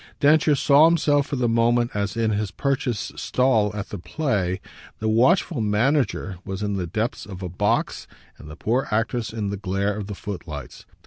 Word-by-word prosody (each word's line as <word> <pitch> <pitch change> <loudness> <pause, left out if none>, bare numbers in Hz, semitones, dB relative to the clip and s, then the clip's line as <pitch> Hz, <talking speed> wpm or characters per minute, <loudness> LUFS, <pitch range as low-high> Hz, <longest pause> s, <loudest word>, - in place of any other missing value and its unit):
Densher 150 +1 +4
saw 140 +2 +5
himself 145 -4 +2
for - - -3
the 125 -2 +1
moment 120 +1 +2
as 100 +1 -2
in 115 -1 +1
his 105 -1 -1
purchased 130 -3 -2
stall 125 -5 +2
at 100 -1 -5
the 100 - -6
play; 95 - -1 0.4
the 110 - -3
watchful 130 - +3
manager 105 - 0
was 95 +1 -5
in 100 -1 -1
the 95 -3 -2
depths 110 +8 -2
of 95 -2 -8
a 90 - -3
box 100 +4 -1 0.3
and 75 - -11
the 75 - -9
poor 125 - 0
actress 115 +2 -1
in 105 -3 -3
the 100 - -3
glare 100 +1 -1
of 105 -2 -5
the 105 - -5
footlights. 85 -6 -7
110 Hz, 185 wpm, -23 LUFS, 100-130 Hz, 0.4 s, saw